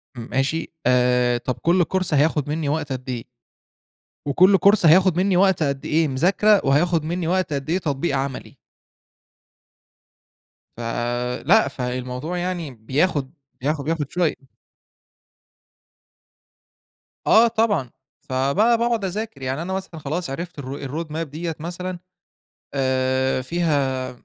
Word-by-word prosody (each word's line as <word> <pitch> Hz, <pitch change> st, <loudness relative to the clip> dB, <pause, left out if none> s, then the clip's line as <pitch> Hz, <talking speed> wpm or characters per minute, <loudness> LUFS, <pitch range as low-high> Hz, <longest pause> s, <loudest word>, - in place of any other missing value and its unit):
م 120 Hz, -, -7 dB
ماشي؟ 145 Hz, +6 st, -1 dB
آآ 125 Hz, -1 st, +3 dB
طب 125 Hz, +1 st, -3 dB
كل 175 Hz, +1 st, +3 dB
كورس 185 Hz, 0 st, -2 dB
هياخد 150 Hz, 0 st, +2 dB
منّي 150 Hz, -1 st, -1 dB
وقت 150 Hz, -1 st, -2 dB
قد 130 Hz, 0 st, -5 dB
إيه؟ 120 Hz, -2 st, -3 dB, 1.0 s
وكل 185 Hz, +7 st, +5 dB
كورس 200 Hz, -2 st, +4 dB
هياخد 180 Hz, +2 st, +5 dB
منّي 185 Hz, 0 st, +2 dB
وقت 190 Hz, -4 st, +3 dB
قد 140 Hz, -2 st, -2 dB
إيه 160 Hz, 0 st, +2 dB
مذاكرة؟ 190 Hz, +9 st, +3 dB
وهياخد 155 Hz, +3 st, +2 dB
منّي 170 Hz, +1 st, -2 dB
وقت 185 Hz, -2 st, 0 dB
قد 140 Hz, +1 st, -4 dB
إيه 170 Hz, -, +2 dB
تطبيق 145 Hz, -4 st, -1 dB
عملي؟ 135 Hz, 0 st, -5 dB, 2.2 s
فلأ، 120 Hz, -, +1 dB
فالموضوع 125 Hz, +6 st, -4 dB
يعني 175 Hz, -5 st, -3 dB
بياخد 135 Hz, +5 st, -1 dB, 0.3 s
بياخد 145 Hz, 0 st, -1 dB
بياخد 155 Hz, -3 st, -2 dB
شوية. 160 Hz, -6 st, -1 dB, 2.8 s
آه 230 Hz, +1 st, +7 dB
طبعًا. 215 Hz, -, +1 dB, 0.4 s
فبقى 140 Hz, -, +2 dB
باقعد 235 Hz, -3 st, 0 dB
أذاكر. 200 Hz, -5 st, -5 dB
يعني 130 Hz, +4 st, -2 dB
أنا 190 Hz, +2 st, -4 dB
مثلًا 190 Hz, -4 st, -5 dB
خلاص 155 Hz, +3 st, -3 dB
عرفت 165 Hz, +3 st, -6 dB
الroad 140 Hz, +4 st, -5 dB
map 150 Hz, -, -8 dB
ال-ro 165 Hz, -, -1 dB
ديًة 160 Hz, +2 st, -5 dB
مثلًا، 175 Hz, +2 st, -5 dB, 0.7 s
آآ 130 Hz, -1 st, +1 dB
فيها 140 Hz, -4 st, -1 dB
155 Hz, 125 wpm, -22 LUFS, 130-180 Hz, 2.8 s, آه